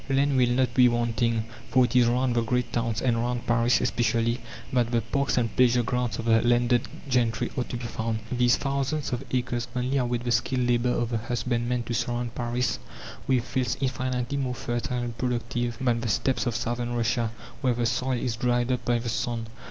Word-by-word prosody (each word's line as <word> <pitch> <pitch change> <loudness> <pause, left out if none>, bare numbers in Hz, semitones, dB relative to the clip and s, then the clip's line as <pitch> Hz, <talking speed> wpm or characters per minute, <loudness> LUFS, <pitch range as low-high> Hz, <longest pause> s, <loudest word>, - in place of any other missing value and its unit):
Land 140 +1 +2
will 125 -2 +4
not 130 +1 +1
be 125 -2 +6
wanting, 115 -1 0 0.2
for 130 -1 +5
it 125 - -4
is 125 -2 +6
round 125 +1 +1
the 120 - +3
great 125 +2 -1
towns, 115 -1 -1
and 120 -3 +2
round 120 +1 -1
Paris 120 +1 +3
especially, 115 +1 +1 0.3
that 120 -2 +2
the 120 -1 +1
parks 140 +2 -1
and 115 -2 0
pleasure 125 -1 +4
grounds 120 -2 -1
of 115 - -5
the 115 -1 +4
landed 120 0 +2 0.2
gentry 120 -3 +1
are 125 - -1
to 120 - -5
be 120 - -6
found. 115 -1 -2
These 125 -1 +3
thousands 140 +1 -1
of 120 - -2
acres 120 -1 -1
only 125 +2 0
await 120 -2 0
the 120 - -1
skilled 125 +1 +1
labour 120 0 +2
of 120 -1 0
the 115 - 0
husbandman 120 +1 -1
to 120 - -4
surround 120 0 -2
Paris 120 0 -1 0.5
with 130 -3 +2
fields 125 -2 -1
infinitely 130 0 -1
more 130 -2 -2
fertile 120 +1 -2
and 120 -1 -4
productive 120 -1 -2
than 120 -3 +1
the 115 - -2
steppes 125 +4 +1
of 120 - -1
southern 120 +1 -2
Russia, 115 0 +1 0.3
where 125 -3 +2
the 120 0 0
soil 125 +2 0
is 120 -1 -2
dried 120 +1 +1
up 125 - -1
by 120 0 +2
the 120 +1 -4
sun. 120 -1 -2
120 Hz, 205 wpm, -26 LUFS, 120-125 Hz, 0.5 s, be